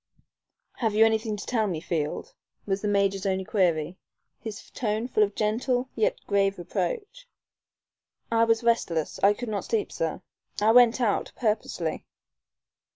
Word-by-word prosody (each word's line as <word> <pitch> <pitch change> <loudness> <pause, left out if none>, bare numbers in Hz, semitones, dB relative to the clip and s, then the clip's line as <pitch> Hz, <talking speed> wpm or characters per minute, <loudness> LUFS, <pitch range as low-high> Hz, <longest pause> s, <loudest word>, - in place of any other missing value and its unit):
"Have 225 -4 0
you 220 +1 +7
anything 220 -1 0
to 205 - -7
tell 225 -4 0
me, 170 -5 -2
Field?" 165 - -3 0.3
was 195 -1 -1
the 210 - -1
major's 200 -1 +1
only 190 0 0
query, 175 -4 0 0.4
his 220 -2 -8
tone 220 0 -2
full 220 - +1
of 205 -1 +2
gentle 245 +4 0
yet 220 - +1
grave 200 0 +1
reproach. 475 - -4 1.0
"I 230 0 +4
was 225 0 +2
restless. 175 -9 0
I 200 +1 +6
could 240 +1 -5
not 205 -3 -3
sleep, 220 -2 -1
sir. 165 -1 -3 0.4
I 215 +2 +4
went 245 +1 +6
out 215 -4 0
purposely." 210 -8 -2
210 Hz, 150 wpm, -26 LUFS, 195-230 Hz, 1.0 s, you